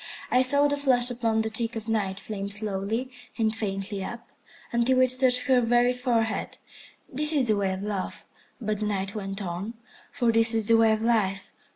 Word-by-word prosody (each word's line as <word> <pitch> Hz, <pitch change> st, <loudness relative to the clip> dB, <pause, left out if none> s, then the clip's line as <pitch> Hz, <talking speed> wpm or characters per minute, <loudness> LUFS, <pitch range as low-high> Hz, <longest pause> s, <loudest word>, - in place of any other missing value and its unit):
I 250 Hz, -, +4 dB
saw 285 Hz, +3 st, +5 dB
the 285 Hz, 0 st, -1 dB
flush 255 Hz, -3 st, +3 dB
upon 225 Hz, -2 st, 0 dB
the 220 Hz, -, -2 dB
cheek 230 Hz, +1 st, -2 dB
of 225 Hz, 0 st, -6 dB
Night 200 Hz, -4 st, -1 dB
flame 200 Hz, -2 st, -6 dB
slowly 210 Hz, +4 st, -3 dB, 0.3 s
and 220 Hz, -2 st, 0 dB
faintly 195 Hz, -2 st, -4 dB
up, 235 Hz, +4 st, -8 dB, 0.4 s
until 240 Hz, +2 st, +2 dB
it 255 Hz, -1 st, +4 dB
touched 250 Hz, -1 st, +3 dB
her 260 Hz, -2 st, +3 dB
very 240 Hz, +1 st, +2 dB
forehead. 235 Hz, -3 st, -1 dB, 0.5 s
This 300 Hz, +3 st, +1 dB
is 280 Hz, -6 st, +1 dB
the 215 Hz, -, +2 dB
way 195 Hz, -1 st, 0 dB
of 190 Hz, +1 st, -5 dB
Love. 205 Hz, -2 st, -5 dB, 0.3 s
But 215 Hz, -3 st, -3 dB
the 210 Hz, -, -2 dB
Night 195 Hz, -1 st, -2 dB
went 195 Hz, -1 st, -5 dB
on, 190 Hz, +6 st, -5 dB, 0.4 s
for 235 Hz, -2 st, +1 dB
this 225 Hz, 0 st, +4 dB
is 220 Hz, -2 st, 0 dB
the 230 Hz, -, +4 dB
way 225 Hz, -1 st, +4 dB
of 220 Hz, 0 st, -1 dB
Life. 205 Hz, -5 st, 0 dB
225 Hz, 195 wpm, -26 LUFS, 205-245 Hz, 0.5 s, saw